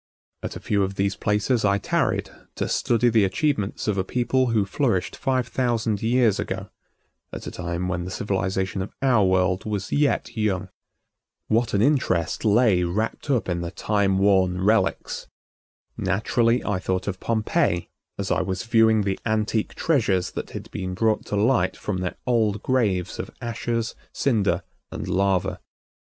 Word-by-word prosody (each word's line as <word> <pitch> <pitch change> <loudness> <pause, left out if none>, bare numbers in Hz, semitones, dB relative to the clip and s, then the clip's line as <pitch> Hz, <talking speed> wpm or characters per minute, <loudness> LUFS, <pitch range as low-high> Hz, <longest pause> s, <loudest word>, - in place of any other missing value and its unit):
At - - -5
a - - -5
few 100 -1 0
of 95 0 -1
these 100 0 0
places 105 +4 +1
I 100 -1 +3
tarried - - 0 0.2
to - - -2
study 120 +1 +2
the 110 -2 +4
achievements 105 0 -1
of 100 -2 +1
a - - +1
people 125 +5 +1
who 110 -4 +2
flourished 100 -3 0
five 130 -2 0
thousand 120 -4 0
years 115 -2 +3
ago, - - -4 0.6
at - - -7
a - - -5
time 85 +1 -3
when 90 -1 -2
the 90 - -5
civilization 95 -1 -1
of 95 - -5
our 125 -6 +4
world 95 0 +2
was 105 -2 -3
yet 140 -5 +1
young. 105 -5 -1 0.8
What 115 0 +2
an 100 - +3
interest 120 - +1
lay 105 -3 +4
wrapped 105 +10 -2
up 125 -8 +1
in 85 -2 -1
the 85 - -3
time 100 0 +1
worn 95 -2 +3
relics! 110 +3 +1 0.7
Naturally 115 +5 +1
I 100 -3 0
thought 95 0 -2
of 95 -2 -3
Pompeii 110 - 0 0.3
as - - -3
I - - +2
was 95 +1 -3
viewing 115 -1 +4
the 95 -1 -1
antique 110 0 0
treasures 105 - +1
that - - -5
had - - -8
been 90 0 -4
brought 110 +2 +1
to - - -2
light 120 +5 +2
from 100 -3 -3
their 90 -1 -3
old 110 -4 +1
graves 105 -9 0
of - - -4
ashes, 115 0 -2 0.2
cinder 100 -9 +1 0.3
and - - -5
lava. 95 -1 +1
105 Hz, 165 wpm, -24 LUFS, 95-115 Hz, 0.8 s, the